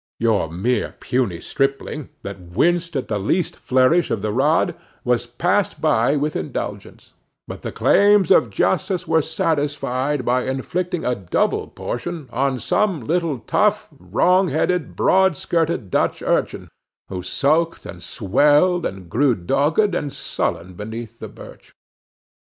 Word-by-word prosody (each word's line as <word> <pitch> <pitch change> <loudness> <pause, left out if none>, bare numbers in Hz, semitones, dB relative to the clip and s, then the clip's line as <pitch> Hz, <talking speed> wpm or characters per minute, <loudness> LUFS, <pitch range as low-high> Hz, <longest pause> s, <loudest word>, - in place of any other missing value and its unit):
Your 110 -8 +1
mere 100 +10 -1
puny 120 -9 -1
stripling, 135 +1 -2
that 100 -1 -6
winced 165 - 0
at 135 - -2
the 105 -2 -1
least 165 - 0
flourish 130 +7 +2
of 105 - -2
the 105 - -1
rod, 150 +8 +2 0.3
was 120 -1 0
passed 180 +11 0
by 145 -3 +2
with 150 +1 -1
indulgence; - - -6 0.3
but - - -8
the - - -5
claims 205 -2 +4
of 120 - +5
justice 175 - 0
were 160 0 +3
satisfied 145 -5 -1
by 125 +1 +1
inflicting 170 +7 -2
a 125 - +2
double 95 -6 -1
portion 160 +3 -5
on 135 0 0
some 175 - 0
little 165 -5 -1
tough 210 0 +1
wrong 185 +1 +2
headed, 160 0 -1
broad 190 -4 +3
skirted 165 - -1
Dutch - - 0
urchin, - - -1 0.4
who 90 -1 -4
sulked 155 - 0
and - - -9
swelled 150 - +2
and 95 -2 -9
grew 125 +7 +2
dogged 145 - +1
and 150 -5 -2
sullen 90 -6 -3
beneath 110 +4 -7
the - - -6
birch. - - -14
140 Hz, 140 wpm, -21 LUFS, 115-170 Hz, 0.4 s, of